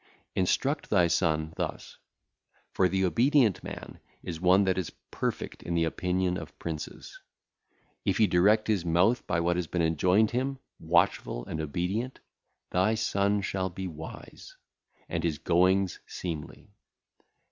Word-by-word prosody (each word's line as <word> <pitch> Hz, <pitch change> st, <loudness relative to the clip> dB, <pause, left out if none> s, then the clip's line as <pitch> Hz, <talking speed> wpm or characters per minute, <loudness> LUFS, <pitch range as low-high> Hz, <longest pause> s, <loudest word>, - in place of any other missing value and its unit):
Instruct 135 Hz, -, 0 dB
thy 90 Hz, -4 st, +4 dB
son 80 Hz, -1 st, +1 dB
[thus]; -, -, -4 dB, 0.7 s
for 95 Hz, -1 st, +2 dB
the 95 Hz, +1 st, +1 dB
obedient 120 Hz, -, +3 dB
man -, -, -8 dB, 0.2 s
is 80 Hz, -1 st, -6 dB
one 95 Hz, +2 st, +5 dB
that 95 Hz, -1 st, +1 dB
is 90 Hz, -, -3 dB, 0.2 s
perfect -, -, -3 dB
in 85 Hz, -, -3 dB
the 85 Hz, -, +3 dB
opinion 90 Hz, +2 st, 0 dB
of -, -, -9 dB
princes. 80 Hz, -2 st, -6 dB, 0.8 s
If 95 Hz, -, +1 dB
he 110 Hz, -, +5 dB
direct 105 Hz, +4 st, +3 dB
his 105 Hz, -6 st, +1 dB
mouth 90 Hz, +8 st, +2 dB
by 85 Hz, -, +1 dB
what 85 Hz, +1 st, +1 dB
hath 90 Hz, -3 st, -2 dB
been 90 Hz, -2 st, 0 dB
enjoined 90 Hz, +7 st, +3 dB
him, 130 Hz, +3 st, -1 dB, 0.2 s
watchful 80 Hz, -7 st, +1 dB
and 80 Hz, -, -4 dB
obedient, 90 Hz, -, -2 dB, 0.5 s
thy 95 Hz, +5 st, +2 dB
son 100 Hz, -1 st, +1 dB
shall 95 Hz, -1 st, -2 dB
be 95 Hz, +2 st, -6 dB
wise, 80 Hz, -2 st, -9 dB, 0.5 s
and 80 Hz, -, -3 dB
his 80 Hz, -3 st, 0 dB
goings 90 Hz, +3 st, +2 dB
seemly. 80 Hz, -4 st, -6 dB
90 Hz, 140 wpm, -28 LUFS, 85-100 Hz, 0.8 s, one